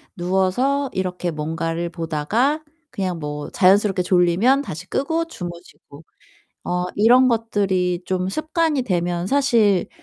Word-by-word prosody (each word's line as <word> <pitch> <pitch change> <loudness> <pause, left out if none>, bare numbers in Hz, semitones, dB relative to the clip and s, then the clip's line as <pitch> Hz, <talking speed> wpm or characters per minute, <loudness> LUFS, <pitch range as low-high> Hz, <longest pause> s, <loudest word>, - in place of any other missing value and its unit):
누워서 190 +11 0
이렇게 180 -2 -2
뭔가를 165 +2 -3
보다가 180 - -1 0.3
그냥 185 -3 -3
뭐 150 -1 -5
자연스럽게 195 0 +3
졸리면 180 +9 +3
다시 185 - -7
끄고 325 +4 -1
주무시고 175 - -10 0.6
어 180 0 -1
이런 245 +5 +5
것들이 195 -6 0
좀 185 0 -1
습관이 310 - 0
되면 175 -4 -1
사실 230 -7 +2
185 Hz, 270 characters per minute, -21 LUFS, 175-250 Hz, 0.6 s, 이런